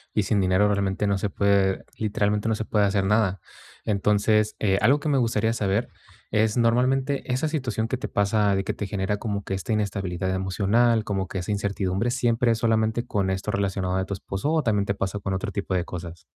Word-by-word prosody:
y 105 - +3
sin 105 0 +1
dinero 95 +2 +3
realmente 100 0 0
no 100 -1 +1
se 105 - -1
puede 100 0 +1
literalmente, 105 0 0
no 110 - +1
se 110 - -4
puede 105 -2 +2
hacer 100 -1 +1
nada. 100 -2 +2 0.5
Entonces, 105 +1 +2
eh, 95 -2 +2
algo 135 +7 +4
que 150 - -2
me 140 - +2
gustaría 115 -1 +1
saber 100 +1 0 0.4
es, 110 +1 +2
normalmente, 130 +3 +1
esa 130 +5 0
situación 125 -8 -2
que 130 - -2
te - - -5
pasa, 100 0 +2
de 95 - 0
que - - -2
te 105 - -5
genera, 100 0 -1
como 100 -2 -3
que 95 - -4
esta 95 +4 -2
inestabilidad 95 -3 -2
emocional, 105 +5 +2
como 95 -3 -2
que 95 - -5
esa 90 - -4
incertidumbre, 100 +1 -1
¿siempre 120 -1 +1
es 115 - +1
solamente 110 +1 +1
con 100 -5 -1
esto 95 0 -2
relacionado 95 -2 -1
de 95 - 0
tu 100 - -4
esposo, 95 +9 -3
o 160 -1 +2
también 105 -4 +1
te 100 - 0
pasa 95 +1 -3
con 95 -1 -2
otro 100 +3 -3
tipo 100 -1 -2
de 90 -1 0
cosas? 85 -2 -8
105 Hz, 215 wpm, -25 LUFS, 95-115 Hz, 0.5 s, algo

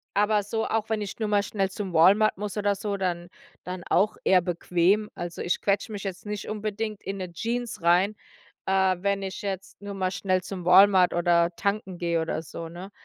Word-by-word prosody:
aber 210 0 +3
so, 220 +2 -2
auch 220 -1 -1
wenn 220 -1 0
ich 200 -1 -5
nur 220 - -1
mal 205 -1 +3
schnell 195 -3 -1
zum 195 -2 -5
Walmart 200 +6 +5
muss 205 0 -4
oder 205 -1 +1
so, 200 0 -3
dann 175 -2 -2 0.3
dann 180 -1 -6
auch 205 +4 +3
eher 185 -1 +5
bequem. 180 +4 +1
Also, 175 -1 -6
ich 175 - 0
quetsche 205 +3 0
mich 205 -1 -6
jetzt 190 0 -6
nicht 210 -1 -5
unbedingt 215 0 -4
in 195 +1 -4
'ne 185 -2 -5
Jeans 235 +2 -3
rein, 180 +5 +3 0.5
äh, 190 -1 +3
wenn 200 0 0
ich 190 - -5
jetzt 195 0 -5
nur 205 0 -6
mal 185 -1 -1
schnell 185 -1 0
zum 185 -2 -7
Walmart 185 0 +6
oder 175 -1 +3
tanken 200 -3 -2
gehe 170 -1 0
oder 160 0 -2
so, 165 +1 -8
ne? 180 +4 -9
195 Hz, 200 wpm, -26 LUFS, 180-210 Hz, 0.5 s, Walmart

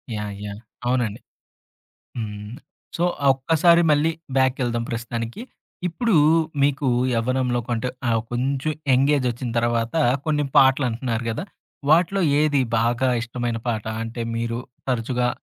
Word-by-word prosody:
Yeah! 105 -1 -4
Yeah! 100 +1 -7 0.3
అవునండి. 120 -4 0 1.0
హ్మ్. 105 -1 -6 0.4
So, 170 - +1 0.2
ఆ - - +3
ఒక్కసారి 165 +5 +4
మళ్ళీ 150 +2 +3 0.3
బ్యాకెళ్దాం 125 -3 +1
ప్రస్తుతానికి. 115 - -4 0.5
ఇప్పుడు 220 +6 0 0.5
మీకు 140 0 +1 0.3
యవ్వనంలో 125 +1 0
కంటే, 120 +1 -1 0.2
ఆహ్, 115 -1 +2
కొంచెం 135 +4 -1 0.2
యంగేజొచ్చిన 130 -2 +1
తర్వాత, 115 -1 0 0.3
కొన్ని 150 -1 +1
పాటలు 135 0 +5
అంటున్నారు 115 0 -3
గదా! 115 - -3 0.5
వాటిలో 180 +5 +4 0.2
ఏది 150 -2 +3 0.2
బాగా 120 +3 +1
ఇష్టమైన 120 -1 -3
పాట? 110 -3 -1 0.2
అంటే, 115 +1 -5
మీరు 115 0 -2 0.3
తరచుగా 125 0 0
125 Hz, 115 wpm, -23 LUFS, 115-140 Hz, 1.0 s, పాటలు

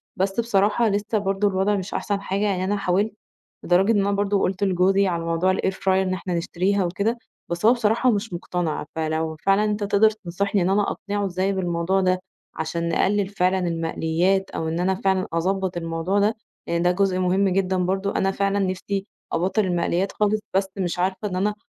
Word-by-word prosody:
بس 195 +2 -1
بصراحة 220 0 +2
لسة 205 +2 0
برضه 195 +1 0
الوضع 195 +1 +1
مش 190 -1 -4
أحسن 200 -1 -2
حاجة، 200 0 -2
يعني 190 -3 0
أنا 205 +2 0
حاولت، 200 +2 0 0.5
لدرجة 185 +5 +4
إن 215 - +3
أنا 200 0 +1
برضه 200 0 +1
قُلت 190 +1 -1
لجوزي 195 +1 +3
على 170 -2 -1
موضوع 170 +3 +1
الair 190 - 0
fryer 190 - -13
إن 190 0 +2
إحنا 185 0 -4
نشتريها 185 +3 0
وكده، 200 +7 -1 0.3
بس 170 +4 -2
هو 230 - +7
بصراحة 235 +1 +2
مش 205 -2 -2
مقتنع 170 -3 -3
فلو 160 0 -2
فعلًا 195 +2 +4
أنت 210 0 -1
تقدر 205 +2 +4
تنصحني 200 -1 -2
إن 175 - +1
أنا 200 +2 +3
أقنعه 205 0 -3
إزاي 190 +1 -1
بالموضوع 180 0 0
ده، 185 0 +2 0.4
علشان 170 +1 -2
نقلل 200 +3 +1
فعلًا 190 -1 +1
المقليات، 165 +3 0
أو 160 - -3
إن 165 +1 -2
أنا 190 +2 +1
فعلًا 190 0 0
أضبّط 185 +2 -1
الموضوع 165 +4 -1
ده، 210 +2 +2 0.3
لأن 170 0 0
ده 180 - +4
جزء 185 0 +1
مهم 185 +2 +2
جدًا 190 0 +1
برضه، 195 +2 -1
أنا 195 - +2
فعلًا 200 +1 0
نفسي 195 +1 -2 0.3
أبطّل 185 +6 +1
المقليات 180 +1 0
خالص، 210 0 +1 0.2
بس 195 0 +2
مش 180 -2 -2
عارفة 190 +3 -1
إن 180 - -4
أنا 205 +3 0
190 Hz, 190 wpm, -23 LUFS, 180-200 Hz, 0.5 s, هو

